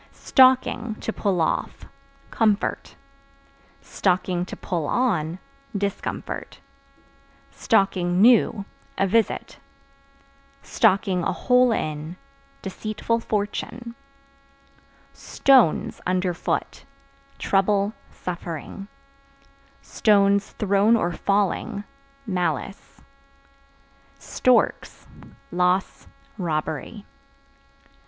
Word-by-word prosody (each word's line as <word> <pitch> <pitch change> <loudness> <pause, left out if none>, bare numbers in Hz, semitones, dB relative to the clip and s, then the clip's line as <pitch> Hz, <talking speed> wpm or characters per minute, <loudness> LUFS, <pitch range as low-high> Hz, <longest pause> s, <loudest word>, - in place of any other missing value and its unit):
Stocking 255 -4 +3
(To 225 - -3
pull 195 -4 -1
off) 160 - -2 0.5
comfort; 215 -2 0 1.1
(to 180 -1 0
pull 165 -5 -3
on) 175 -10 0 0.4
discomfort; 200 0 -4 1.4
(new) 195 +4 +3 0.3
a 195 - +2
visit; 225 +4 0 1.1
(a 190 -4 +2
hole 250 -1 +3
in) 155 -3 -3 0.5
deceitful 215 +4 -2
fortune. 230 +2 -4 1.2
Stones 260 - +2
(Under 180 0 0
foot) 170 - -3 0.5
trouble, 200 +1 +1 0.2
suffering; 175 +2 -7 1.0
(thrown 200 +1 +2
or 175 -6 0
falling) 200 +2 -1 0.4
malice. 180 - -3 1.2
Storks - - 0 0.5
Loss, 180 +2 0 0.3
robbery. 160 +4 -3
195 Hz, 60 wpm, -23 LUFS, 180-220 Hz, 1.4 s, Stocking